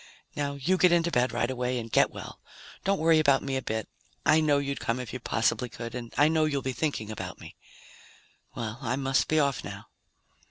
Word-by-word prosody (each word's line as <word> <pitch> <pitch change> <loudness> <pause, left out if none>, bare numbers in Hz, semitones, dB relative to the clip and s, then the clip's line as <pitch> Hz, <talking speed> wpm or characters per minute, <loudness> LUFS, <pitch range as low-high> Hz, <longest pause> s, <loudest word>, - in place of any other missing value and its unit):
Now 140 -1 -2
you 170 +7 +1
get 180 - +6
into 170 0 +3
bed 125 -2 +2
right 120 - 0
away 125 0 -1
and 115 -1 -5
get - - +4
well. - - -9 0.4
Don't 195 0 +2
worry 160 -1 +4
about 140 -3 +4
me 135 -1 -2
a 130 - 0
bit. 110 -3 -3 0.4
I 160 - +5
know 150 -2 +3
you'd 140 0 -2
come 115 +2 -1
if 125 -4 -6
you 125 - -4
possibly 120 +1 0
could. 115 +1 -7
And 120 -2 -6
I 145 - +6
know 160 0 +3
you'll 140 -3 -1
be 130 - -2
thinking 125 -8 -2
about 110 - -6
me. - - -11 1.0
Well, 115 0 -4
I 130 -1 -1
must 135 0 +1
be 155 - +2
off 140 -3 +1
now." - - -8
135 Hz, 215 wpm, -28 LUFS, 120-155 Hz, 1.0 s, get